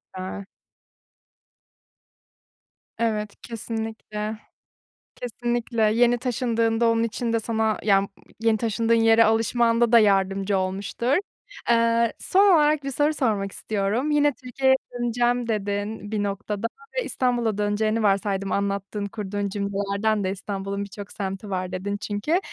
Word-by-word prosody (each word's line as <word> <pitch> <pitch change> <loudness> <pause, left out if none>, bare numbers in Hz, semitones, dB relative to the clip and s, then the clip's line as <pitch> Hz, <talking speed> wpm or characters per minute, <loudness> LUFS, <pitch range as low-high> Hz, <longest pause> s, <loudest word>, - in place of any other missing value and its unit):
A. 190 +2 -6 2.5
Evet. 215 -3 -1
Kesinlikle. 220 -2 -5 0.8
Kesinlikle. 240 -1 -2
Yeni 240 +1 +4
taşındığında 230 -2 +1
onun 230 0 +2
için 230 +1 -2
de 230 - +2
sana 220 -1 0
ya, 195 -2 +4
mmm, 200 - -4 0.3
yeni 225 -1 +2
taşındığın 230 +1 0
yere 225 0 +5
alışmanda 230 +1 +2
da 235 - +8
yardımcı 195 -1 +2
olmuştur. 195 +7 -1 0.6
Aaa, 230 0 +4
son 390 +1 +4
olarak 300 -1 +3
bir 275 - -3
soru 290 +3 +2
sormak 215 -9 0
istiyorum. 215 +10 -1
"Yine 290 -1 +3
Türkiye'ye 265 +1 +1 0.2
döneceğim" 240 0 0
dedin, 205 0 -3
"...bir 210 -1 0
noktada." 205 +2 -3 0.3
ve - - +1
İstanbul'a 240 -4 0
döneceğini 215 +2 0
varsaydım 195 -1 +1
anlattığın, 200 +1 -2
kurduğun 200 0 -3
cümlelerden 200 +1 -1
de: 190 - 0
"İstanbul'un 200 0 -4
birçok 200 0 -9
semti 195 +1 -5
var." 185 -1 -2
dedin 195 +2 -3
çünkü. 210 - -1
220 Hz, 125 wpm, -24 LUFS, 200-235 Hz, 2.5 s, da